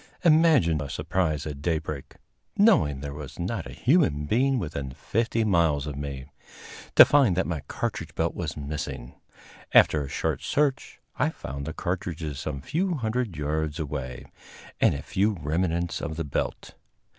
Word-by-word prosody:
Imagine 155 - +5
my 75 -2 -3
surprise 75 0 -1
at 75 -2 -6
daybreak 75 -3 -3 0.4
knowing 80 - +4
there 70 -1 -5
was 75 -2 -8
not 90 +1 -3
a - - -9
human 120 - +2
being 130 - +2
within 75 - -4
fifty 115 - -1
miles 85 -8 +2
of 75 -2 -5
me 70 -2 -5 0.7
to - - +11
find 135 -11 +4
that 95 - +2
my 85 -3 -2
cartridge - - -4
belt - - 0
was - - -4
missing. 70 -4 -5 0.6
After 75 -2 +6
a 70 - -7
short - - -2
search 140 -2 0 0.2
I - - +3
found 70 +2 -7
the - - -2
cartridges 85 -6 -3
some 70 -2 -4
few 175 - -1
hundred 115 - -2
yards 75 +1 -2
away, 65 -5 -5 0.5
and - - +4
a 70 - -6
few 105 +3 +1
remnants 85 +2 -1
of 80 - -4
the 85 - -1
belt. 70 - -3
80 Hz, 155 wpm, -26 LUFS, 70-110 Hz, 0.7 s, to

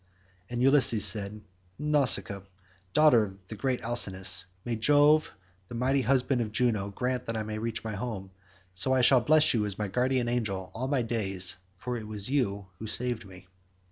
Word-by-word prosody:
And 120 0 -2
Ulysses 130 -6 +4
said, 105 0 0 0.4
"Nausicaa, 140 -9 +2 0.5
daughter 115 -8 +4 0.2
of 110 - -6
great 130 -2 -1
Alcinous, 95 -5 -1 0.2
may 120 - -2
Jove 145 +6 +4 0.4
the 120 - -8
mighty 130 +3 +1
husband 130 -1 +1
of 110 -2 -3
Juno, 105 -4 0
grant 125 +4 -3
that 115 0 -3
I 110 - -2
may 110 0 -5
reach 115 0 -4
my 110 -1 -4
home; 100 -3 -5 0.4
so 130 +8 +2
shall 130 +1 +6
I - - -11
bless 155 0 +4
you 110 -3 +1
as 105 -2 -3
my 105 - -2
guardian 125 +3 0
angel 105 -6 -3
all 125 +3 -4
my 135 -3 0
days, 95 -6 +1 0.2
for 125 +5 -4
it 110 -2 -8
was 105 +2 -4
you 100 -8 -1
who 110 - -6
saved 120 -1 -2
me." 95 0 -14
115 Hz, 175 wpm, -28 LUFS, 105-130 Hz, 0.5 s, shall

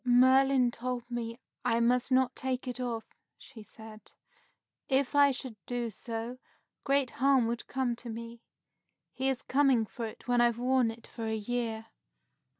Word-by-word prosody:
"Merlin 260 0 +5
told 245 0 -4
me 235 0 -4 0.2
I 235 -2 +2
must 245 +2 +2
not 255 0 +3
take 260 0 -3
it 250 0 -3
off," 235 -3 -3 0.3
she 245 -5 -13
said. 220 0 -13 0.8
"If 270 -1 +2
I 285 0 +6
should 260 -3 -4
do 240 -2 -2
so, 230 +3 -6 0.4
great 275 -2 +2
harm 270 -1 +3
would 235 +1 -3
come 255 -2 -1
to 240 - -8
me. 230 +1 -7 0.7
He 265 +1 0
is 265 -2 -2
coming 265 -4 +3
for 230 +2 -5
it 220 - -12
when 245 -1 +3
I've 235 -1 +3
worn 250 -1 +2
it 225 +1 -9
for 225 -2 -6
a 220 - -1
year." 225 0 -3
245 Hz, 160 wpm, -30 LUFS, 230-260 Hz, 0.8 s, I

